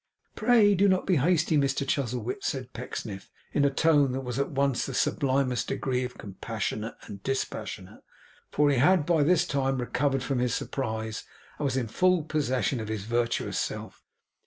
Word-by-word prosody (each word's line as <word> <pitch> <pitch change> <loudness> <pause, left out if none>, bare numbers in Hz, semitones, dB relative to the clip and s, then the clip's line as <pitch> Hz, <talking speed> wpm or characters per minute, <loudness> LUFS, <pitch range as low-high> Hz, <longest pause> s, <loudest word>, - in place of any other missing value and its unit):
'Pray 215 -2 +5
do 200 +1 +4
not 185 -1 +2
be 185 -4 +3
hasty, 160 +2 +2
Mr 140 0 0
Chuzzlewit,' 125 -3 -2
said 130 -2 -3
Pecksniff, 110 -5 -6 0.2
in 145 - +2
a 140 - +5
tone 145 -2 +3
that 135 - -2
was 125 +1 -3
at 140 - 0
once 140 -2 0
in 135 - -5
the - - -1
sublimest 130 -2 +1
degree 125 -1 -1
compassionate 110 0 -5
and 100 -1 -9
dispassionate; 135 +3 -4 0.5
for 145 -1 +3
he 140 - +1
had 165 +3 +4
by 165 -2 +3
this 160 +3 +3
time 135 -1 0
recovered 135 +2 0
from 135 -3 -1
his 125 -1 +1
surprise, 110 -4 -3 0.4
and 150 - -1
was 135 -1 0
in 125 -3 -1
full 180 - +2
possession 130 -5 0
of 110 - -5
his 110 -2 -3
virtuous 120 +2 -1
self. - - -5
135 Hz, 175 wpm, -27 LUFS, 120-150 Hz, 0.5 s, Pray